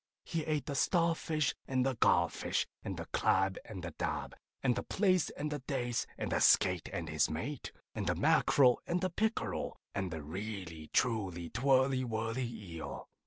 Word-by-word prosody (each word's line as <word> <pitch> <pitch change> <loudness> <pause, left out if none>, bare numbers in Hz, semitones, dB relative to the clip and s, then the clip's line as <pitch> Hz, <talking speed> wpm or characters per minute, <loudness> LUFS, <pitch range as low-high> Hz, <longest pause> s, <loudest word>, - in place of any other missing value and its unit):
He 165 -3 -2
ate 155 -2 0
the 145 - -3
starfish 165 -1 +2
and 130 -1 +1
the 135 - +2
garfish, 115 - +2 0.2
and - - -4
the - - -5
crab 95 0 +2
and 95 -5 -8
the 85 - -4
dab, - - -3 0.3
and 125 -3 +3
the - - -1
plaice 185 -4 +2
and 150 +1 -4
the 145 - -2
dace, 125 -3 -2
and - - -3
the - - +2
skate 90 -3 +4
and 85 -1 -3
his 75 0 +2
mate, 115 - -4 0.2
and - - -3
the - - +2
mackereel 125 -3 +4
and 175 - +1
the 185 -1 0
pickereel, 220 +5 -1 0.2
and 95 -2 -2
the 80 -3 -5
really 90 -2 -6
truly 95 -8 0
twirly 130 +1 +3
whirly 115 +1 -2
eel. 90 -8 -7
120 Hz, 170 wpm, -33 LUFS, 95-145 Hz, 0.3 s, skate